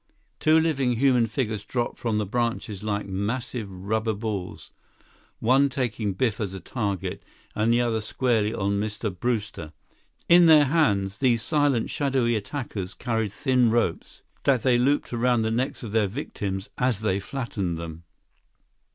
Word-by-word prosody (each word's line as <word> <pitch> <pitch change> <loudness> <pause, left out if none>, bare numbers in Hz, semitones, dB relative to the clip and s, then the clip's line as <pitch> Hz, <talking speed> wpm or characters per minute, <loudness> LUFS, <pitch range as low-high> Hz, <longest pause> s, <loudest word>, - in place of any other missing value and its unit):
Two 155 +1 +5
living 140 -6 +1
human 125 -2 +3
figures 110 -3 -2
dropped 120 +2 -3
from 115 -3 -1
the 105 - 0
branches 115 -2 -2
like 105 -1 -2
massive 105 +3 -3
rubber 110 +4 -2
balls, 100 -4 -5 0.7
one 135 +4 +3
taking 115 -6 -2
Biff 110 +1 0
as 95 -2 -3
a - - -5
target, 100 -4 -3 0.3
the - - -2
other 115 +1 +4
landing 120 -2 +1
squarely 110 -1 0
on 100 -2 -1
Mr. 105 -1 -3
Brewster. 105 -7 -3 0.5
In 175 0 +7
their 155 -2 +7
hands, 100 -11 +1
these 120 -4 +2
silent, 145 -6 +1
shadowy 135 -4 +1
attackers 105 -4 -4
carried 115 -4 -1
thin 125 +1 +2
ropes 115 -7 -1 0.2
that 130 -5 +2
they 125 -2 +4
looped 140 +1 +1
around 120 -1 +2
the 110 - 0
necks 125 +3 -2
of 110 - -6
their 110 -2 +2
victims 100 -4 -4
as 125 -5 +1
they 100 -3 +1
flattened 100 -7 -3
them. 80 -1 -7
115 Hz, 150 wpm, -25 LUFS, 100-125 Hz, 0.7 s, In